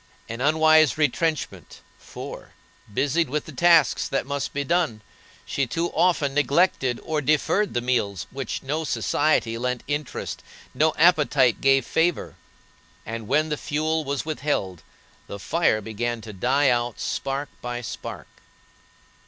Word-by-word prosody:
An 115 +2 -6
unwise 155 +1 +4
retrenchment, 150 - -1 0.2
for, - - -9 0.4
busied 145 +8 +1
with 150 +2 -2
the - - -9
tasks 165 -2 +4
that - - -1
must 140 0 -3
be 145 - -2
done, 160 -8 0 0.4
she 140 -2 -1
too 165 +7 -2
often 155 -6 +2
neglected 140 -3 +2
or 155 -1 -1
deferred 155 +7 +1
the 120 - +1
meals 110 -7 0
to - - -17
which 135 -3 -5
no 150 +4 -2
society 145 -7 0
lent 125 0 -2
interest, 145 -1 -4 0.3
no 155 0 +2
appetite 150 -7 +4
gave 135 -2 +4
flavor; 165 0 0 0.7
and 115 -1 -6
when 155 +5 +2
the 150 - -1
fuel 155 +2 -1
was 140 -1 -3
withheld 140 - -2 0.5
the 100 - -7
fire 110 - +1
began 115 +2 -3
to 110 -1 -9
die 130 +8 +2
out 120 -1 0
spark 140 0 -3
by 120 0 -4
spark. 115 - -7
140 Hz, 140 wpm, -24 LUFS, 120-155 Hz, 0.7 s, unwise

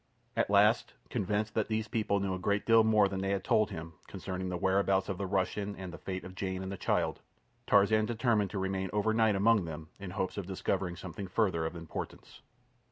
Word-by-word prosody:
At - - +1
last, 105 +3 +4 0.2
convinced 105 0 -1
that 110 - 0
these 110 -1 -1
people 105 -2 0
knew 100 -1 -1
a 95 - -3
great 100 +3 0
deal 115 -1 +6
more 110 -2 +5
than 95 -1 -3
they 95 - -1
had 100 -1 0
told 110 -1 +3
him 80 -4 -7
concerning 95 -1 -5
the 90 - -2
whereabouts 95 +1 +2
of 95 - -3
the 100 - -2
Russian 100 +2 -1
and 90 -2 -7
the - - -8
fate 95 -1 -5
of 95 - -9
Jane 95 0 -3
and 95 - -5
the - - -3
child, - - 0 0.5
Tarzan 105 +2 +4
determined 115 -3 +1
to 100 - -5
remain 95 0 -1
overnight 110 0 +3
among 105 -1 +4
them 80 -1 -7
in 100 -1 -6
the 90 - -9
hope 95 - -2
of 100 -3 -4
discovering 95 -1 -1
something 95 +2 -7
further 90 -5 +1
of 85 - -7
importance. 85 -2 -7
100 Hz, 215 wpm, -31 LUFS, 95-105 Hz, 0.5 s, deal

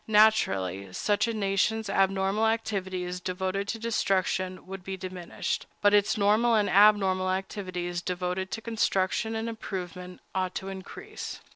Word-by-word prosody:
Naturally, 100 - +3
such 205 - +1
a - - 0
nation's 210 +1 +1
abnormal 195 +2 +2
activities 190 -5 -2
devoted 190 +2 -2
to 225 - -2
destruction 190 -4 0
would 190 -1 -8
be 190 +1 -5
diminished; 185 -2 -4
but 205 0 +4
its 205 +1 +4
normal 215 +3 +4
and 210 -2 +2
abnormal 195 -2 +5
activities 185 -2 -3
devoted 180 +1 -2
to 225 - -4
construction 220 -1 0
and 225 +1 -2
improvement 180 -5 -6
ought 185 -1 -1
to 190 - -4
increase. 190 0 -7
195 Hz, 135 wpm, -28 LUFS, 185-210 Hz, -, abnormal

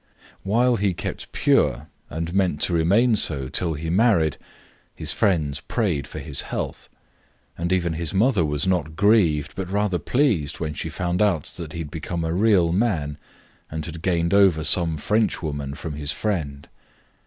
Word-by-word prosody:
While 120 +5 +2
he 95 -3 0
kept - - -6
pure 75 +6 +2 0.2
and 80 +2 -4
meant 95 -6 +1
to 90 - +1
remain 100 +9 +3
so 70 -9 0
till 80 +3 -1
he 80 +2 -4
married 90 - +3 0.6
his - - -1
friends 75 -8 +1
prayed 80 - -1
for - - -9
his 70 -1 -3
health, - - -5 0.7
and 85 +1 -3
even 85 -3 +1
his 80 -2 -3
mother 105 -2 +2
was 75 0 -1
not 85 -5 0
grieved 85 -7 +3
but 95 -2 -4
rather 100 -2 0
pleased 100 - 0
when 80 -2 -3
she - - -4
found 90 +1 -2
out 95 -8 +2
that 80 -3 -7
he - - -6
had 75 -3 -7
become 85 +1 -4
a 80 - -1
real 95 -3 +3
man 85 -8 0 0.5
and 80 0 -5
had 85 -1 -7
gained 85 -1 0
over 95 -6 +4
some 80 -1 +3
French 105 +6 0
woman 70 -2 -4
from 80 0 -6
his 75 0 -1
friend. 75 -10 -3
85 Hz, 170 wpm, -23 LUFS, 75-100 Hz, 0.7 s, over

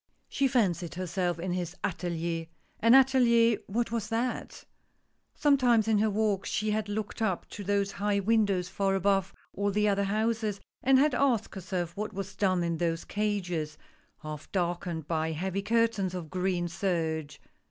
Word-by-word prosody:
She 275 - +1
fancied 185 - 0
herself 180 -1 -1
in 175 +1 -3
his 180 -1 -3
atilier. 170 -2 -2 0.3
An 230 +3 +6
atelier, 235 -4 +5
what 230 +3 -1
was 225 -2 -2
that? 235 +2 -3 0.7
Sometimes 250 -6 +3
in 220 -2 +3
her 215 +1 +3
walks, 210 -2 0
she 215 +1 0
had 210 -1 -1
looked 215 +1 -4
up 190 -5 -1
to 205 - -7
those 200 0 0
high 205 0 0
windows 200 -3 +2
far 195 0 0
above 195 0 +1 0.2
all 200 +1 0
the 210 +1 +1
other 200 0 +2
houses, 215 0 0 0.2
and 265 0 +5
had 290 +1 +4
asked 245 -4 +1
herself 180 -3 -4
what 210 +1 -4
was 195 0 -6
done 185 -3 +1
in 170 -1 -1
those 165 0 -1
cages, 180 -7 -2 0.5
half 155 -1 -7
darkened 175 -3 -2
by 160 -1 -1
heavy 190 +4 -2
curtains 215 -3 +1
of 165 -4 -6
green 180 -1 0
serge. 165 -5 -2
195 Hz, 160 wpm, -29 LUFS, 175-220 Hz, 0.7 s, An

